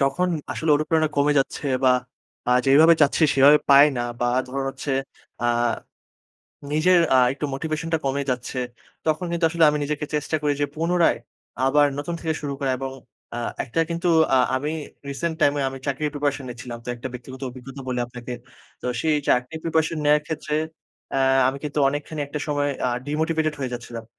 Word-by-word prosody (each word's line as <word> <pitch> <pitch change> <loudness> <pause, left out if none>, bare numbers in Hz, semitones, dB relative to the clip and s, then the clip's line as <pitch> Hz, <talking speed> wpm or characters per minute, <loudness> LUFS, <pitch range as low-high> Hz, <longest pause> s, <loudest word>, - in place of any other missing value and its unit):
যখন 140 +7 +1 0.2
আসলে 160 -1 -1
অনুপ্রেরণা 155 +1 +1
কমে 145 +1 +3
যাচ্ছে 135 +2 -2 0.2
বা 130 - +6 0.6
আ - - +3 0.2
যেভাবে 155 +5 +7
চাচ্ছি, 145 +3 +3
সেভাবে 140 +2 +7
পাই 140 +1 +9
না - - 0 0.2
বা 120 - +2 0.2
ধরুন 135 +1 -3
হচ্ছে 135 +2 -6 0.5
আ - - -1 1.3
নিজের 175 +4 +4 0.2
আ - - +6
একটু 140 - -6
মোটিভেশনটা 160 +3 -2
কমে 140 +1 0
যাচ্ছে। 125 +1 -3 0.5
তখন 155 +3 0
কিন্তু 170 0 0
আসলে 170 0 +3
আমি 150 - -1
নিজেকে 150 0 -3
চেষ্টা 150 +1 0
করি 145 - +2
যে, 145 - +2
পুনরায় 170 -1 +2 0.5
আবার 145 +2 +5
নতুন 160 +4 -3
থেকে 160 -1 -1
শুরু 145 -2 -3
করা 135 -2 0
এবং 135 0 -4 0.4
আ - - -3 0.3
একটা 130 +7 -1
কিন্তু 170 +1 -1 0.3
আ - - +6 0.2
আমি 145 +3 -2 0.4
রিসেন্ট 160 +4 -2
টাইমে 145 -1 +3
আমি 135 0 -7
চাকরির 145 +2 -1
প্রিপারেশন 145 -1 -1
নিচ্ছিলাম। 120 0 -7
তো - - -9
একটা 125 +2 -6
ব্যক্তিগত 130 +1 -9
অভিজ্ঞতা 135 +2 -10
বলি 125 -1 -1
আপনাকে। 120 0 -8 0.5
তো - - -4
সেই 155 -1 +2
চাকরির 125 +6 +1
প্রিপারেশন 160 -1 0
নেওয়ার 150 0 +4
ক্ষেত্রে, 155 -1 -3 0.6
এ্যা 135 - +1 0.3
আমি 135 - -2
কিন্তু 150 0 -3
অনেকখানি 145 +2 -4
একটা 145 +2 -5
সময় 145 -1 0 0.2
আ - - +2 0.2
ডিমোটিভেটেড 155 +1 0
হয়ে 130 -2 -3
যাচ্ছিলাম। 120 -1 -7
145 Hz, 175 wpm, -23 LUFS, 135-155 Hz, 1.3 s, পাই